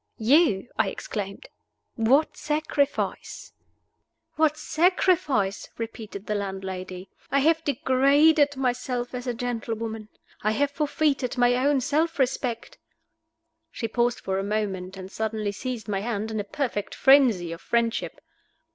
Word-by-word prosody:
"You?" 245 - +3
I 215 -3 +3
exclaimed. 195 0 -6 0.5
"What 260 +7 +2
sacrifice?" 300 -2 -2 0.8
"What 310 -1 +2
sacrifice?" 310 - +1
repeated 220 -3 -7
the 210 - -2
landlady. 190 -2 -5 0.2
"I 275 - +1
have 320 +2 +3
degraded 285 +2 +3
myself 250 -1 -2
as 250 0 -5
a 245 - -1
gentlewoman. 225 -2 -4 0.3
I 215 +1 +1
have 285 +4 +1
forfeited 285 -4 0
my 245 0 +4
own 270 +2 +2
self 320 +6 0
respect." 250 -3 -2 0.9
She 230 - -4
paused 240 +2 0
for 190 0 -1
a - - -2
moment, 195 -3 -3
and 190 0 -8
suddenly 220 -1 -2
seized 240 +2 -5
my 200 -2 -1
hand 220 0 -3
in 220 - -2
a - - -1
perfect 220 -3 -3
frenzy 245 -11 +5
of 165 - -7
friendship. 235 -1 -1
240 Hz, 130 wpm, -25 LUFS, 210-280 Hz, 0.9 s, frenzy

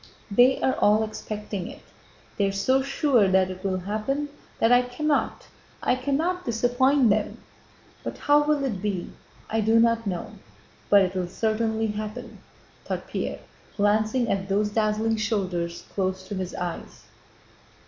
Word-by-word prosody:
They 245 +5 +5
are 260 - +2
all 210 +1 +4
expecting 210 -3 -5
it, - - -11 0.5
they 200 - +1
are - - 0
so 260 +7 +2
sure 270 -5 +2
that 190 0 +3
it 185 0 -9
will 190 -1 0
happen 220 +10 -2 0.3
that 225 - +3
I 245 0 +7
cannot, 285 +4 -1 0.4
I - - +3
cannot, 305 +8 -1
disappoint 245 +2 +3
them. 210 0 0 0.7
But - - -5
how 290 0 +4
will 295 -1 +1
it 220 -9 -2
be? 195 -4 -3 0.4
I 225 0 0
do 220 +2 +4
not 230 -1 +2
know, 205 +4 -3 0.6
but 200 -1 +7
it 185 0 -1
will 185 -2 -2
certainly 220 +3 0
happen!" 215 +3 -5 0.4
thought - - -4
Pierre, - - -4 0.4
glancing 215 +4 +2
at 195 0 -2
those 210 +2 +1
dazzling 220 +1 +1
shoulders 185 -6 -2
close 190 -1 -2
to - - -4
his 185 -2 -4
eyes. 175 -1 -6
215 Hz, 150 wpm, -25 LUFS, 195-245 Hz, 0.7 s, I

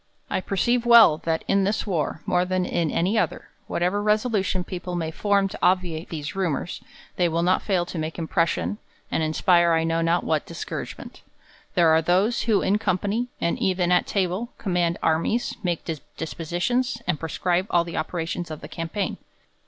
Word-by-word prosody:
I - - 0
perceive 235 +6 +1
well, 230 -10 +7
that 160 -1 0
in 195 0 +3
this 205 +3 0
war, 165 -6 -2
more 180 0 +2
than 185 0 0
in 165 -3 0
any 190 +9 +1
other, - - -2 0.2
whatever 180 +4 0
resolution 210 -3 +1
people 180 0 -5
may 165 -2 -2
form 200 +3 +2
to - - -8
obviate 180 -3 +1
these 150 -1 -5
rumours, 175 -3 -2 0.4
they 175 -1 +3
will 165 +1 0
not 185 +1 +3
fail 185 -4 0
to 175 - -5
make 155 +1 -4
impression, 170 +4 0 0.3
and - - 0
inspire 170 +2 +3
I 165 0 +2
know^ 165 0 +1
not 170 +1 +2
what - - 0
discouragement. - - -7 0.5
There 170 -3 +5
are 160 0 +5
those, 185 +8 +2
who 210 - +3
in 205 +2 +2
company, 205 +5 0
and 170 - 0
even 180 -2 +1
at 180 - +3
table, 195 +4 -1
com 190 -5 -3
mand 170 -1 +1
armies, 165 +9 +1
make 175 -4 -2 0.3
dispositions, 175 +10 -1
and 175 -5 0
prescribe 175 +3 -1
all 175 -4 +3
the 170 0 -6
operations 175 0 -3
of 155 -1 -7
the 150 - -8
campaign. 165 +5 -3
180 Hz, 175 wpm, -24 LUFS, 165-200 Hz, 0.5 s, well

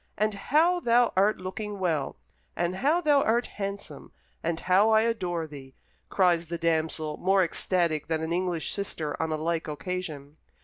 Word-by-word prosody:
And 215 +1 +1
how 315 - +2
thou 240 -4 +3
art 200 +3 +3
looking 205 +3 -5
well, 165 -7 -1 0.4
and 175 +2 -1
how 300 - +2
thou 295 -4 +4
art 235 +1 +2
handsome, 200 -7 -6 0.3
and 165 0 -2
how 190 +4 +4
I 220 0 +5
adore 180 -8 -1
thee!" 135 -3 -11 0.3
cries 175 -3 +2
the 170 +1 -4
damsel, 160 -2 -1
more 190 +1 +3
ecstatic 170 -2 0
than 160 -1 -1
an 160 +1 -2
English 175 -2 -1
sister 160 -7 -3
on 160 0 -1
a 155 - 0
like 165 +1 -2
occasion. 155 -2 -5
180 Hz, 165 wpm, -27 LUFS, 160-210 Hz, 0.4 s, I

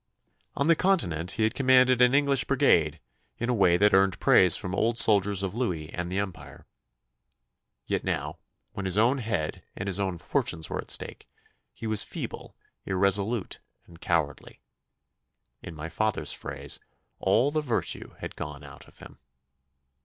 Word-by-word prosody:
On 140 - 0
the 165 +1 +5
Continent 90 - +1
he 110 - -1
had 110 +1 +1
commanded 130 -2 +4
an 125 +2 +5
English 140 -1 +3
brigade 85 - +2 0.4
in 120 - -3
a - - +2
way 90 -6 +3
that 105 +2 +3
earned 95 -2 +3
praise - - +5
from 90 - -5
old 115 +3 0
soldiers 100 -3 +3
of 95 - -3
Louis 90 -10 -3
and 90 0 -4
the 95 - -2
Empire. 100 -2 -6 1.2
Yet - - -2
now, - - -3 0.3
when 100 - -6
his 95 +1 +2
own 120 +6 +3
head 100 -10 -3
and 95 - -5
his 100 -1 0
own 95 -3 -2
fortunes 85 - -1
were - - -3
at - - -7
stake, - - -4 0.4
he - - -10
was 110 -2 +2
feeble, - - -7 0.3
irresolute, 100 +3 0 0.3
and 85 0 -17
cowardly. 80 -5 -2 1.0
In 85 - -9
my 75 +1 -6
father's 110 +5 -1
phrase, - - -4 0.4
'all 140 +4 +2
the 155 +1 0
virtue 125 -6 -3
had - - -7
gone 70 0 -7
out 70 - -13
of - - -20
him. - - -14
100 Hz, 160 wpm, -27 LUFS, 90-125 Hz, 1.2 s, the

